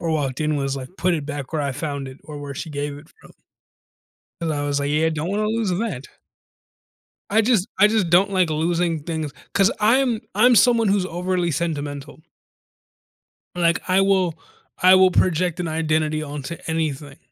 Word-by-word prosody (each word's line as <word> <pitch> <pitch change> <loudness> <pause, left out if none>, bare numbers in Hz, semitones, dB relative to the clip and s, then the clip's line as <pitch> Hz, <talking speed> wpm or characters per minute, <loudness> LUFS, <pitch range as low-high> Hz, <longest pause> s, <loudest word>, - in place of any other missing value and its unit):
or 165 - -2
walked 145 -3 -1
in 155 -1 0
was, 135 -1 -1
like, 130 -1 -7
put 180 -1 +2
it 150 - -3
back 145 -2 -6
where 155 -2 -1
I 140 - -1
found 140 -1 -4
it 130 +1 -12
or 150 -1 -8
where 145 -1 -7
she 160 +4 -6
gave 145 0 -4
it 150 - -15
from. - - -17 1.1
And 165 -1 -1
I 145 -1 -2
was, 145 0 -1
like, 140 0 -1
"Yeah, 155 +2 +2
don't 160 +2 -3
wanna 210 +2 0
lose 220 -1 -1
that." 180 - -3 1.2
I 220 +2 +4
just 220 -4 +2
I 210 - +7
just 210 -5 +1
don't 185 +4 +4
like 185 -3 +2
losing 165 0 0
things 160 -3 -4 0.2
'cause 195 +2 +4
I'm 230 +1 +2
I'm 245 +4 +5
someone 230 0 +4
who's 195 -1 +2
overly 180 0 -1
sentimental. 145 -2 -4 1.3
Like 170 -1 +1
I 185 +1 +3
will 190 -4 +2 0.5
I 185 +1 +7
will 185 0 +5
project 180 -1 +1
an 175 - -2
identity 155 -1 0
onto 150 +2 -6
anything. 150 -3 -3
165 Hz, 180 wpm, -22 LUFS, 145-185 Hz, 1.3 s, I